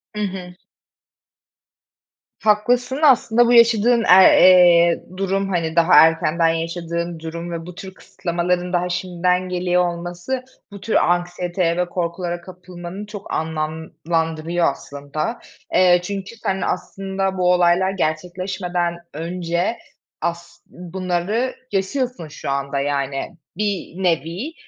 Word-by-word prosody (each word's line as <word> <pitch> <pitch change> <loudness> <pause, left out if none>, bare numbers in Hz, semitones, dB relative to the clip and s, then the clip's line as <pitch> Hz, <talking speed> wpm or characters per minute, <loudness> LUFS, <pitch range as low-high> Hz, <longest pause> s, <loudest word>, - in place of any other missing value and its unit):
Hı 210 - -3
hı. 185 -2 -5 1.9
Haklısın, 245 +5 +2
aslında 240 -4 +5
bu 245 - +3
yaşadığın, 235 0 +5
aaa, 190 +1 +7
eee, 175 -2 +6
durum, 195 0 -1
hani, 165 -3 -1
daha 170 +1 +4
erkenden 165 +1 +4
yaşadığın 170 +1 -3
durum 170 +2 -6
ve 165 -1 -5
bu 180 - -10
tür 190 +1 -9
kısıtlamaların 180 0 -3
daha 180 0 0
şimdiden 180 0 -1
geliyor 180 0 +1
olması, 175 +9 -5 0.3
bu 200 -1 -10
tür 225 - -2
anksiyeteye 175 0 0
ve 180 - +1
korkulara 175 0 -3
kapılmanı 180 +2 -9
çok 205 -1 -8
anlamlandırıyor 160 +1 -2
aslında. 145 - -5 0.3
Eee, 180 -1 +5
çünkü 195 +3 -6
sen, 190 -4 -3
aslında, 195 +1 -3
bu 180 0 +3
olaylar 180 +1 +3
gerçekleşmeden 180 +1 -2 0.2
önce 170 +5 -2 0.4
as 170 +1 -4
bunları 185 +7 -3 0.2
yaşıyorsun 200 - -2
şu 150 -2 -7
anda, 140 0 -2
yani, 140 +1 -3 0.2
bir 195 -3 -3
nevi 175 - -1
180 Hz, 115 wpm, -20 LUFS, 170-190 Hz, 1.9 s, aaa